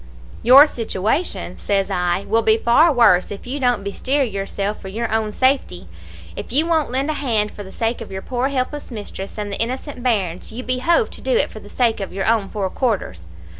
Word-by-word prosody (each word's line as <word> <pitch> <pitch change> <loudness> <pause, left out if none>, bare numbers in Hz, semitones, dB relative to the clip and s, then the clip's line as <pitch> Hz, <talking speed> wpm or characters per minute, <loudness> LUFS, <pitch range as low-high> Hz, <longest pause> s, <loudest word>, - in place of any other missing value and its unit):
"'Your 265 +5 +9
situation,' 220 - -2
says 195 -1 -1
I, 180 +2 0
'will 225 +2 +2
be 220 0 +3
far 270 +9 +4
worse 230 -9 +4
if 205 - -8
you 265 +4 -4
don't 245 -6 +1
bestir 260 +8 0
yourself 200 -2 -3
for - - -8
your 220 +3 -3
own 220 -1 0
safety. 260 - 0 0.5
If - - -7
you 295 +6 +3
won't 320 -3 +1
lend 270 +4 0
a 300 - -4
hand 215 -6 0
for - - -10
the 190 -1 -10
sake 230 +3 -2
of 220 - -8
your 190 0 -6
poor 250 +1 -1
helpless 280 +2 -3
mistress 205 -4 -7
and 205 -1 -4
the - - 0
innocent 255 +3 -3
bairns, 195 -9 -1
you 245 +3 -6
behove 290 - +1
to - - -10
do - - 0
it 485 - +2
for - - -9
the - - -14
sake 235 -3 +1
of 195 - -5
your 195 0 -3
own 220 -3 +1
four 195 -3 -3
quarters.' 190 - -2
225 Hz, 210 wpm, -20 LUFS, 200-260 Hz, 0.5 s, Your